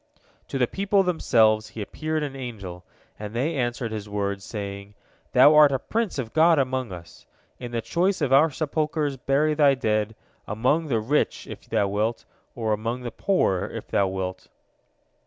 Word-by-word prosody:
" - - -35
To - - -3
the 125 - +3
people 195 - +1
themselves 110 - +3
he 110 - -8
appeared 155 +7 -3
an 140 -2 -5
angel, 100 -9 -7 0.4
and 105 +1 -7
they 145 +7 0
answered 120 -3 -2
his 105 -1 -5
words, 100 -1 -2
saying: 100 -1 -7 0.4
"Thou 150 - +7
art 150 -2 +7
a 135 - +1
prince 220 - -2
of 120 -5 -4
God 165 +1 +5
among 130 -4 -1
us. 85 -3 -11 0.3
In 120 -1 -7
the 115 -1 -2
choice 185 +3 0
of 140 -4 +1
our 150 +4 +6
sepulchres 155 -1 -1
bury 140 +4 +1
thy 145 -2 +4
dead, 110 -3 -1 0.3
among 130 +9 +1
the 120 -6 +1
rich 135 +8 0
if - - -11
thou 100 - +1
wilt, 105 +4 -1 0.3
or 110 -2 0
among 115 +4 -3
the 120 - -4
poor 140 - +1
if - - -8
thou 100 - +2
wilt." 95 -1 -4
125 Hz, 175 wpm, -25 LUFS, 105-150 Hz, 0.4 s, Thou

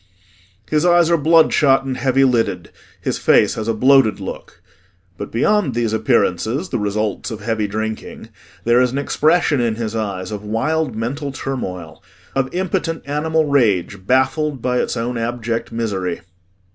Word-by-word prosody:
His 155 0 +1
eyes 175 -1 +4
are - - +5
bloodshot 155 -3 +4
and 130 -1 -3
heavy 135 +1 +2
lidded, 125 -4 0 0.3
his - - -3
face - - +4
has 110 0 -5
a 115 - +1
bloated 130 -1 +4
look. - - -8 0.6
But 100 - -7
beyond 150 - +1
these 115 -2 0
appearances 110 - 0
the 125 - -2
results 105 +1 -2
of 110 -3 -7
heavy 110 -1 -1
drinking 110 +1 -5 0.3
there 120 +1 +4
is 125 -1 +2
an 135 - -3
expression 155 0 +2
in 115 -2 0
his 115 -1 -4
eyes 100 -4 -3
of 105 -1 -5
wild 130 +5 -1
mental 140 +6 -3
turmoil, 90 -12 -6 0.3
of 135 -1 -1
impotent 180 -2 -2
animal 155 +2 0
rage 100 - +1
baffled 135 +2 +1
by 125 +1 0
its - - -2
own 120 +1 -2
abject 115 0 -3
misery. 100 -6 -3
120 Hz, 155 wpm, -19 LUFS, 110-145 Hz, 0.6 s, are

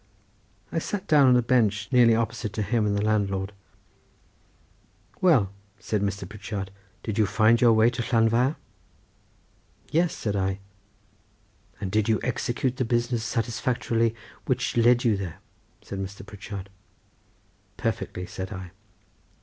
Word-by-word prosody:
I - - 0
sat 200 -1 -4
down 145 -3 +6
on 125 -1 +6
a 125 - +2
bench 105 -4 +2
nearly 120 -2 +6
opposite 115 -2 -2
to 105 - -1
him 110 0 +1
and 100 0 0
the 100 - 0
landlord. 100 -2 0 1.7
"Well," 135 - +4 0.3
said 105 +1 -2
Mr. 100 -2 -2
Pritchard; 100 -1 -6 0.3
"did 110 -1 -3
you 105 - +4
find 110 +3 +4
your 120 -2 +6
way 110 +2 +5
to 120 - -3
Llanfair?" 120 +4 +2 1.4
"Yes," 170 +2 +2
said 105 -2 -2
I. 95 -1 0 1.2
"And 95 - -4
did 110 +1 +1
you 110 - +3
execute 125 +1 -1
the 130 - +1
business 120 0 0
satisfactorily 115 0 0 0.3
which 125 -1 0
led 120 +1 +4
you 115 -3 +3
there?" 95 -5 -5 0.5
said 100 - -6
Mr. 100 +1 -6
Pritchard. 100 -1 -8 1.1
"Perfectly," 90 - -3
said 95 +1 -6
I. 95 -2 -7
110 Hz, 135 wpm, -26 LUFS, 100-120 Hz, 1.7 s, down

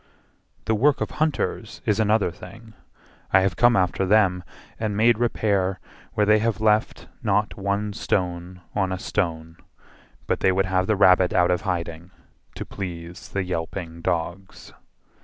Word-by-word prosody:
The 110 - +1
work 135 +7 +3
of - - -3
hunters 155 -1 -2
is 105 0 +1
another 110 -3 +2
thing: 110 +6 -13 0.6
I 95 - +6
have 95 -3 0
come 120 0 +4
after 95 0 +1
them 95 -2 +3 0.4
and 105 -2 -2
made 115 +1 +4
repair 100 -5 0 0.4
Where 105 - +3
they 110 +1 +5
have 110 -2 -1
left 110 +1 +1
not 105 -2 0
one 100 +1 -2
stone 90 -1 -2
on 95 -2 0
a 95 - -2
stone, 80 -4 -3 0.7
But - - -1
they 95 - +3
would 95 +1 +1
have 95 0 0
the 110 - +2
rabbit 90 -2 +5
out 90 0 +3
of 90 - 0
hiding, 85 -3 -4 0.5
To - - -6
please 85 -3 -7
the 100 - -2
yelping 85 -1 -5
dogs. 90 +2 -4
95 Hz, 155 wpm, -24 LUFS, 90-105 Hz, 0.7 s, I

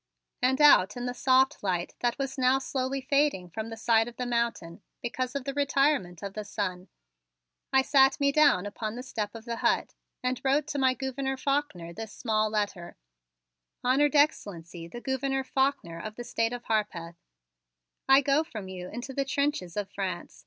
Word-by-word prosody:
And 260 +1 +2
out 245 -9 +6
in 245 - -4
the 245 - -2
soft 260 +1 +3
light 180 -3 -1
that 240 +1 0
was 275 -1 -3
now 255 0 +3
slowly 265 0 -2
fading 275 -10 +1
from 220 +5 -5
the 225 - -7
side 225 0 +3
of 240 - -9
the 250 - -2
mountain 235 -8 -2 0.2
because 250 +2 -3
of 280 - -2
the 275 - -3
retirement 275 - +1
of 200 -1 -5
the 215 - -5
sun, 185 -2 -4 0.8
I 265 0 +4
sat 270 0 +4
me 280 0 +3
down 285 -11 +4
upon 215 +2 -4
the 250 - -6
step 215 -4 -4
of 225 0 -9
the 235 -1 -4
hut - - +1 0.3
and 255 0 -1
wrote 280 +2 +2
to 285 - -2
my 260 -1 +3
Gouverneur 265 0 -3
Faulkner 260 -12 -2
this 220 +2 -7
small 215 -2 0
letter: 205 -5 -3 0.9
"Honored 280 +4 +3
Excellency, 175 - 0
the 240 +8 -9
Gouverneur 270 +1 -1
Faulkner, 265 -11 -1
of 215 +4 -7
the 240 - -6
State 230 -1 -1
of 245 0 -6
Harpeth: 175 -6 -2 0.9
"I 270 +1 +8
go 280 +3 +2
from 220 - -8
you 180 -1 -7
into 245 +4 -6
the 275 - 0
trenches 275 - -1
of 205 -2 -3
France. 185 -4 -5
245 Hz, 180 wpm, -28 LUFS, 205-270 Hz, 0.9 s, I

